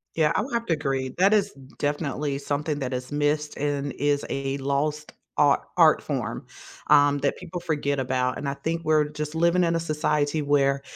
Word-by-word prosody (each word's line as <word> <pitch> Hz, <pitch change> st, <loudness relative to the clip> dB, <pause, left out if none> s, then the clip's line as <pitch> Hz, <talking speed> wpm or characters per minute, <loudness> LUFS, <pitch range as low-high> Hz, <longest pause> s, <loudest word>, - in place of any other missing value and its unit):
Yeah, 155 Hz, -1 st, +2 dB
I -, -, +2 dB
would 250 Hz, +3 st, -6 dB
have 235 Hz, 0 st, 0 dB
to 165 Hz, -, +1 dB
agree, 135 Hz, -3 st, -1 dB
that 195 Hz, +3 st, +4 dB
is 205 Hz, -1 st, +2 dB, 0.3 s
definitely 145 Hz, -1 st, -1 dB
something 145 Hz, +1 st, -2 dB
that 130 Hz, -1 st, -3 dB
is 125 Hz, +1 st, -5 dB
missed, 150 Hz, 0 st, 0 dB
and 145 Hz, -1 st, -2 dB
is 145 Hz, 0 st, 0 dB
a 135 Hz, 0 st, -2 dB
lost 145 Hz, +2 st, -2 dB, 0.2 s
ar -, -, +4 dB
art -, -, +6 dB
form, -, -, -3 dB, 0.4 s
um, 145 Hz, 0 st, +5 dB
that 140 Hz, 0 st, 0 dB
people 180 Hz, -1 st, -7 dB
forget 150 Hz, -4 st, -1 dB
about, 130 Hz, -1 st, 0 dB
and 140 Hz, -, -3 dB
I 140 Hz, -, -3 dB
think 165 Hz, +2 st, -3 dB
we're 155 Hz, -1 st, +3 dB
just 150 Hz, +1 st, -5 dB
living 170 Hz, +2 st, +3 dB
in 170 Hz, 0 st, +2 dB
a 165 Hz, -, +1 dB
society 150 Hz, -1 st, 0 dB
where 140 Hz, -1 st, +2 dB
145 Hz, 190 wpm, -25 LUFS, 140-160 Hz, 0.4 s, art